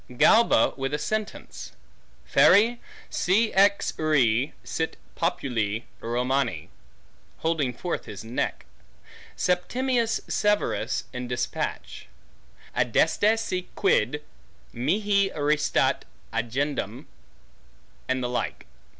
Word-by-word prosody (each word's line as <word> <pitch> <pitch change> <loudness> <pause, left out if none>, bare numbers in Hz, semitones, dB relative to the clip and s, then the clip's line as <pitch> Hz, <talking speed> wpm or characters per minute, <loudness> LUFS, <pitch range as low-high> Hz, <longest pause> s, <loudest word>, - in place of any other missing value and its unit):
Galba 230 - +5
with 135 +1 -2
a - - -1
sentence; 215 +5 -4 0.5
Feri, 230 +4 +5 0.3
si 215 +5 +2
ex 200 +1 +3
re 135 -5 +2
sit 160 0 -3 0.2
populi 115 - -1 0.2
Romani; 120 - -1 0.7
holding 160 -6 0
forth 170 +9 -4
his 100 -1 -8
neck. 115 +2 -3 0.7
Septimius 230 +6 0
Severus 210 0 0
in 125 0 -4
despatch; 125 0 -4 0.7
Adeste 215 +2 +3
si 185 -5 -3
quid 150 -6 +1 0.5
mihi 200 - +1
restat 150 0 +1 0.3
agendum. 130 0 -2 1.0
And 130 -1 0
the - - 0
like. 125 - -3
150 Hz, 90 wpm, -26 LUFS, 125-200 Hz, 1.0 s, Galba